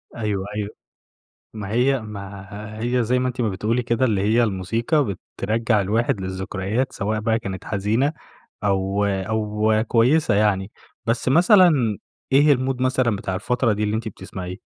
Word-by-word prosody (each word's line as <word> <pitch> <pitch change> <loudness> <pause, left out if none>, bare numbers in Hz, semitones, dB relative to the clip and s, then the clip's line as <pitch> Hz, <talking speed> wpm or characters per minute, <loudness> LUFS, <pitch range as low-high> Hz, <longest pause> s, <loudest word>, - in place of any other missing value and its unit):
أيوه، 105 -4 -2
أيوه. 105 -1 -2 0.8
ما 105 -3 -6
هي 130 +3 +2
ما 100 +1 -8
هي 120 +1 +1
زي 125 +3 +1
ما 130 - 0
أنتِ 125 0 -3
بتقولي 110 +3 0
كده، 120 +2 +1
اللي 105 -5 +1
هي 110 +4 +3
الموسيقى 115 - 0 0.2
بترجّع 110 +1 +1
الواحد 105 +1 0
للذكريات، 95 +5 -2
سواء 105 +2 -1
بقى 110 +1 +1
كانت 95 -4 -6
حزينة، 110 +8 0 0.5
أو 100 0 +1
أو 105 +2 0
كويسة 125 +6 +3
يعني. 100 -1 +1 0.3
بس 115 +2 0
مثلًا 180 - +6 0.6
إيه 145 +2 +6
المود 130 -1 0
مثلًا 130 -3 +2
بتاع 95 -1 -4
الفترة 120 +3 +1
دي 105 - -2
اللي 105 0 0
أنتِ 110 +1 -3
بتسمعيه؟ 95 -2 -7
110 Hz, 145 wpm, -22 LUFS, 100-125 Hz, 0.8 s, مثلًا